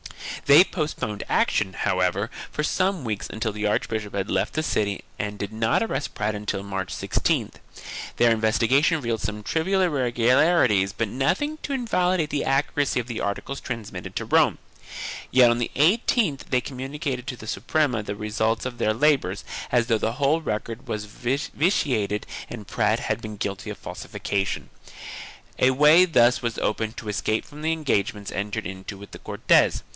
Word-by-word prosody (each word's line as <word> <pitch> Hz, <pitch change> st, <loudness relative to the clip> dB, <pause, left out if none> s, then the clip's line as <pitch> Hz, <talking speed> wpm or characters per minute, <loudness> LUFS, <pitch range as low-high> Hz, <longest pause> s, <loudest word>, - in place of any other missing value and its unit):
They 145 Hz, +5 st, +9 dB
postponed 150 Hz, -, -3 dB
action, 95 Hz, -, +2 dB
how 90 Hz, -, 0 dB
ever, 90 Hz, +4 st, 0 dB, 0.2 s
for 150 Hz, -, -2 dB
some 185 Hz, 0 st, 0 dB
weeks 105 Hz, -2 st, -3 dB
until 110 Hz, 0 st, -2 dB
the 105 Hz, 0 st, -2 dB
archbishop 105 Hz, 0 st, -1 dB
had 100 Hz, 0 st, -2 dB
left -, -, 0 dB
the 155 Hz, -, -1 dB
city 105 Hz, -8 st, -1 dB, 0.2 s
and 105 Hz, -1 st, -3 dB
did 100 Hz, +1 st, -5 dB
not 110 Hz, -, +2 dB
arrest 145 Hz, -10 st, -3 dB
Prat 105 Hz, +1 st, -1 dB
until 105 Hz, -1 st, -3 dB
March 95 Hz, -2 st, -4 dB
16th. -, -, 0 dB, 0.6 s
Their 120 Hz, -1 st, +5 dB
investigation 115 Hz, +8 st, +3 dB
revealed 115 Hz, -6 st, -2 dB
some 105 Hz, -1 st, -4 dB
trivial 190 Hz, -, +1 dB
irregularities 125 Hz, -, +3 dB
but 115 Hz, -, -1 dB
nothing 290 Hz, -, 0 dB
to 280 Hz, -, -3 dB
invalidate 180 Hz, -, +1 dB
the 145 Hz, -, 0 dB
accuracy 140 Hz, 0 st, +1 dB
of 120 Hz, -, -3 dB
the 120 Hz, -2 st, -4 dB
articles 100 Hz, +7 st, -3 dB
transmitted 115 Hz, -4 st, -6 dB
to -, -, -2 dB
Rome, -, -, +3 dB, 0.7 s
yet 125 Hz, -2 st, +6 dB
on 120 Hz, -, 0 dB
the 120 Hz, -, -1 dB
18th 180 Hz, -, +2 dB
they 125 Hz, -1 st, +2 dB
com 125 Hz, +1 st, -8 dB
municated 135 Hz, -2 st, -4 dB
to 130 Hz, -3 st, -4 dB
the 110 Hz, -, -10 dB
Suprema 125 Hz, +3 st, 0 dB
the 105 Hz, 0 st, -5 dB
results 110 Hz, +2 st, -1 dB
of 125 Hz, -2 st, -5 dB
their 110 Hz, 0 st, +1 dB
labors 130 Hz, -8 st, +2 dB, 0.3 s
as 120 Hz, -1 st, +3 dB
though 115 Hz, -1 st, +1 dB
the 115 Hz, -, 0 dB
whole 145 Hz, +5 st, +2 dB
record 115 Hz, 0 st, -4 dB
was 105 Hz, -2 st, -3 dB
vitiated 125 Hz, -, 0 dB, 0.2 s
and 110 Hz, -4 st, -8 dB
Prat -, -, +1 dB
had -, -, -2 dB
been 110 Hz, -1 st, -7 dB
guilty 100 Hz, +1 st, -4 dB
of 105 Hz, -, -7 dB
falsi 90 Hz, -1 st, -7 dB
fication. 95 Hz, -1 st, -2 dB, 1.0 s
A 130 Hz, -, +5 dB
way 150 Hz, +7 st, +6 dB
thus 125 Hz, -8 st, +4 dB
was 120 Hz, -1 st, -2 dB
opened 110 Hz, +1 st, -1 dB
to 110 Hz, -, -7 dB
escape 110 Hz, +1 st, -1 dB
from 150 Hz, 0 st, -12 dB
the 160 Hz, +1 st, +1 dB
engagements 105 Hz, -10 st, -1 dB
entered 100 Hz, +1 st, -3 dB
into 95 Hz, +2 st, -7 dB
with 100 Hz, +1 st, -12 dB
the -, -, -9 dB
Cortes. -, -, +2 dB
120 Hz, 170 wpm, -24 LUFS, 105-145 Hz, 1.0 s, They